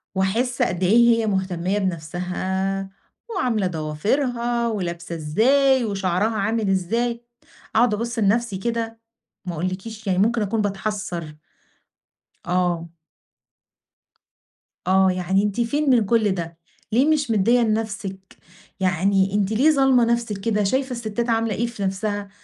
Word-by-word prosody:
واحس 225 +7 0
قد 180 +1 0
إيه 195 +6 +4 0.2
هي 225 - 0
مُهتمية 190 -1 -1
بنَفسَها، 190 +2 -2 0.4
وعاملة 240 - 0
ضوافرها 235 - -1
ولابسة 170 -5 -4
إزاي 255 - +3
وشعرها 200 +1 0
عامل 220 +1 0
إزاي، 235 +6 0 0.5
أقعد 230 0 +4
أبُص 235 +3 -3
لنَفسِي 220 0 +1
كده، 230 +2 -3 0.5
ما 175 - -4
أقولكيش 190 +6 -5
يعني 185 -1 +1
ممكن 225 +3 +2
أكون 215 +2 0
باتحسَّر. 195 -5 -3 1.1
آه. 175 -2 0 2.0
آه 190 0 +4
يعني 185 +2 +1
أنتِ 210 +3 -1
فين 285 +5 0
من 240 -5 +4
كل 215 -1 +2
ده؟ 170 -2 -4 0.3
ليه 245 +5 +4
مش 295 -6 +1
مدِّية 225 +4 +3
لنَفسِك 210 -4 -3 0.4
يعني 190 +1 +2
أنتِ 205 0 +1
ليه 265 +8 +4
ظالمة 270 -4 +4
نَفسِك 235 -3 0
كده؟ 210 +1 0
شايفة 260 +6 0
الستات 235 0 -3
عاملة 225 -2 +1
إيه 235 - 0
في 230 -4 -6
نَفسَها؟ 200 +1 -2
205 Hz, 125 wpm, -22 LUFS, 190-235 Hz, 2.0 s, إيه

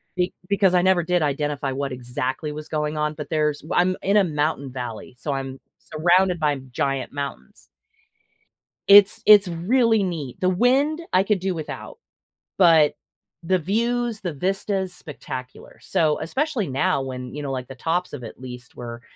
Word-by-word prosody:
be 180 0 0 0.2
because 195 -2 +3
I 175 - +4
never 185 -1 +4
did 175 0 +1
identify 145 -1 -1
what 135 +1 -3
exactly 125 +4 -3
was 150 0 -7
going 150 0 -2
on- 150 0 -1
but 150 - -7
there's 150 -2 0
w 155 - -6
I'm 185 +1 0
in 200 +2 +2
a 205 - +6
mountain 150 -4 -1
valley, 125 -1 -7
so 145 - -4
I'm 135 -1 -5 0.2
surrounded 175 +3 +2
by 150 -2 +1
giant 135 +1 -2
mountains. 140 - -7 1.2
It's 200 0 +7
it's 205 -2 +8
really 220 +6 +2
neat. 160 -9 -4
The 185 - +2
wind, 265 - +2
I 185 - +5
could 200 -1 0
do 190 0 -1
without, 160 - -7 0.6
but 165 -5 +5 0.5
the 185 +2 +2
views, 235 +5 -1
the 175 -5 -3
vista's 190 +3 -2
spectacular. 130 -6 -9
So 155 -2 +1
especially 260 - -1
now 135 +1 +1
when, 125 -1 -6
you 150 - -5
know, 140 - -3
like 130 -2 -4
the 135 - -9
tops 170 +7 -1
of 135 -4 -7
at 115 - -9
least 125 -1 -10
were 120 -1 -7
155 Hz, 170 wpm, -23 LUFS, 135-190 Hz, 1.2 s, it's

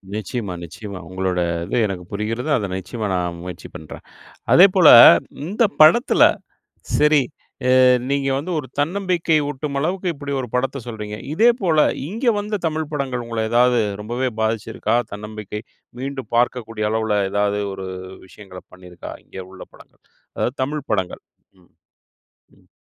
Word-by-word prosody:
நிச்சயமா, 105 -1 -4
நிச்சயமா. 100 +3 -8
உங்களோட, 95 -1 -2 0.3
இது 95 - -2
எனக்கு 95 -2 -5
புரிகிறது. 115 +7 -3
அதை 105 -4 -3
நிச்சயமா 105 +4 -5
நான் 90 -1 -3
முயற்சி 90 -1 -8
பண்றேன். 80 - -10 0.5
அதேபோல, 185 -2 +6 0.6
இந்த 205 +7 0 0.2
படத்தில 205 - +6 0.8
சரி 150 0 +4 0.6
அ - - +6 0.3
நீங்க 140 -1 0
வந்து 150 +7 -4
ஒரு 145 - -5
தன்னம்பிக்கை 175 0 0
ஊட்டும் 140 0 -4
அளவுக்கு 180 +5 -1
இப்பிடி 145 -1 -6
ஒரு 125 - -5
படத்த 135 +2 -1
சொல்றீங்க. 105 -3 -6 0.2
இதேபோல, 200 -4 +2 0.3
இங்க 225 +8 -4
வந்த 210 -1 -3
தமிழ் 155 -1 -2
படங்கள், 130 -4 -3
உங்கள 115 -1 -4
ஏதாவது 125 +1 +4 0.2
ரொம்பவே 120 +5 -2
பாதிச்சிருக்கா? 110 0 -1 0.2
தன்னம்பிக்கை 105 0 -7 0.4
மீண்டும் 135 0 -6
பார்க்கக்கூடிய 115 -3 0
அளவுல. 110 -1 0
எதாவது 105 0 0
ஒரு 95 0 -7 0.4
விஷயங்கள 95 -1 -12
பண்ணியிருக்கா? 90 -1 -11
இங்க - - -11
உள்ள 95 -1 -12
படங்கள். - - -20 0.3
அதாவது 125 - -1
தமிழ் 145 +1 -4
படங்கள். 95 -4 -2 0.4
ம், 90 - -27 0.9
ம். - - -27
120 Hz, 135 wpm, -21 LUFS, 105-150 Hz, 0.9 s, அதேபோல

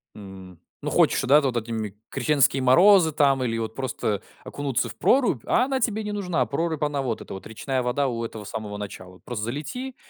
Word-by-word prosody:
м. 95 -4 -11 0.2
Ну, - - -1
хочешь, - - +3
да, 145 +4 +5
ты 140 - 0
вот 120 -2 -1
этими, 110 -3 -4
крещенские 140 0 +2
морозы, 170 +6 +6
там, 140 -3 +2
или 115 -2 -1
вот 110 -1 -3
просто 115 -6 -2 0.2
окунуться 140 -4 -2
в - - -9
прорубь, 245 - +2
а 250 - +3
она 265 0 -1
тебе 220 -3 0
не 210 - -4
нужна. 185 -5 -1
Прорубь, 160 +1 -2
она 145 -2 0
вот 120 -4 -3
эта - - -8
вот 95 - -8
речная 130 +4 -2
вода 130 +3 0
у 115 -2 -3
этого 110 -2 -6
самого 105 0 -6
начала. 95 -3 -8
Просто 110 -4 -4
залети 155 - -5
130 Hz, 200 wpm, -24 LUFS, 110-155 Hz, 0.2 s, морозы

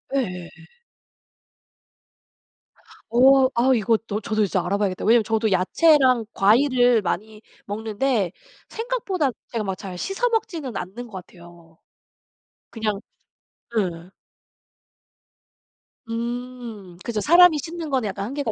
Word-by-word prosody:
예예예. 180 -10 -2 2.6
어 260 +2 +6
아 255 +3 +3
이것도 220 -1 0
저도 215 0 0
이제 190 -1 0
알아봐야겠다. 190 +1 -1
왜냐면 225 +1 +4
저도 220 -1 0
야채랑 255 - +4
과일을 245 +2 +4
많이 210 +4 -4 0.2
먹는데 215 -1 -1 0.4
생각보다 440 - -2 0.2
제가 230 -3 -3
막 190 -2 -3
잘 185 -2 -7
씻어 390 - -1
먹지는 335 - -3
않는 215 +7 -7
것 190 -4 -9
같아요. 170 -2 -17 0.9
그냥 215 -3 -2 0.8
예예. 175 -3 -3 2.0
음 235 -5 -6
그죠. 230 -3 -2
사람이 345 0 +6
씻는 330 +1 -6
거는 260 -6 0
약간 195 +1 -4
한계가 275 0 -3
225 Hz, 235 characters per minute, -23 LUFS, 195-265 Hz, 2.6 s, 어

